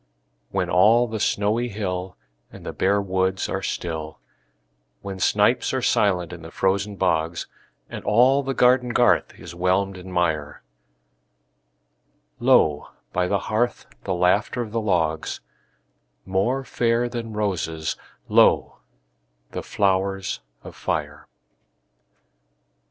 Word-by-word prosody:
When 95 -2 -1
all 110 +7 +4
the 110 -1 -4
snowy 110 +5 0
hill 95 -3 -4 0.3
And - - -12
the - - -5
bare 100 +2 +2
woods 95 -1 0
are - - -3
still; 80 -2 -4 0.9
When 100 -1 -6
snipes - - +2
are - - 0
silent 90 -4 +1
in 85 - -9
the 80 - -9
frozen 100 +4 0
bogs, 85 -3 0 0.4
And - - -8
all 125 +6 +4
the 135 -1 -3
garden 125 -1 +3
garth 120 0 +3
is - - -10
whelmed 95 +2 0
in 95 +1 -10
mire, 80 -5 -1 1.8
Lo, 75 -2 +3 0.3
by 90 - +1
the 100 - +1
hearth, 120 +3 -1 0.2
the 95 - -1
laughter 100 +7 +1
of 110 - -9
the 115 0 -1
logs— 80 -6 0 0.9
More 110 +9 0
fair 120 -1 0
than 120 -2 -5
roses, 85 -7 -2 0.3
lo, - - +4 0.7
the - - -4
flowers 95 -6 0 0.2
of - - -10
fire! - - -3
95 Hz, 120 wpm, -23 LUFS, 90-110 Hz, 1.8 s, all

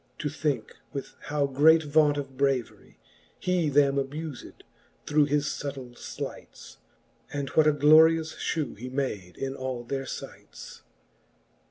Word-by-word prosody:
To 150 - -2
thinke 145 -5 -2 0.2
with 140 - -6
how 145 -1 0
great 155 +4 +5
vaunt 150 0 +3
of 135 -2 -5
braverie 135 -3 -2 0.4
He 180 -4 +1
them 140 -1 +3
abufed, 145 +1 -5 0.4
through 150 0 +3
his 145 0 +1
fubtill 140 -3 -5
flights. - - -8 0.5
And 140 -2 -3
what 155 +3 +4
a - - +6
glorious 160 +2 +5
fhew 155 -5 -3
he 125 +2 -6
made 110 -9 -3
in 135 0 -3
all 130 -2 -4
their 135 +2 -4
fights. - - -9
145 Hz, 135 wpm, -27 LUFS, 135-150 Hz, 0.5 s, a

